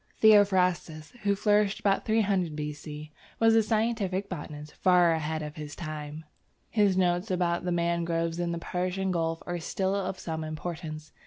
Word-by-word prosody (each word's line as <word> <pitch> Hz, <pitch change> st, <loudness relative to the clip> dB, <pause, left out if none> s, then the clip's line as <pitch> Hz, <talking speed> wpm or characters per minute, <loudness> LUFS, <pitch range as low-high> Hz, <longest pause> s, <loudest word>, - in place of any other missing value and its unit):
Theophrastus, 185 Hz, -7 st, +4 dB
who 200 Hz, 0 st, +2 dB
flourished 205 Hz, 0 st, +2 dB
about 195 Hz, -1 st, +1 dB
300 200 Hz, -7 st, +1 dB
B.C., 150 Hz, 0 st, -6 dB, 0.3 s
was 225 Hz, 0 st, +5 dB
a 225 Hz, -, +6 dB
scientific 215 Hz, -3 st, 0 dB
botanist 150 Hz, 0 st, -7 dB
far 180 Hz, -2 st, +4 dB
ahead 160 Hz, -1 st, -1 dB
of 150 Hz, +1 st, -7 dB
his 150 Hz, -1 st, -7 dB
time. 155 Hz, -1 st, -6 dB, 0.5 s
His 205 Hz, -4 st, +3 dB
notes 180 Hz, +2 st, +1 dB
about 175 Hz, -1 st, 0 dB
the 180 Hz, -, 0 dB
mangroves 170 Hz, -1 st, 0 dB
in 175 Hz, -1 st, -1 dB
the 170 Hz, -, -2 dB
Persian 185 Hz, +2 st, -2 dB
gulf 165 Hz, -2 st, -1 dB
are 175 Hz, 0 st, -3 dB
still 190 Hz, +3 st, -1 dB
of 190 Hz, -1 st, -2 dB
some 160 Hz, -1 st, -4 dB
importance. 155 Hz, -1 st, -6 dB
175 Hz, 155 wpm, -28 LUFS, 160-195 Hz, 0.5 s, a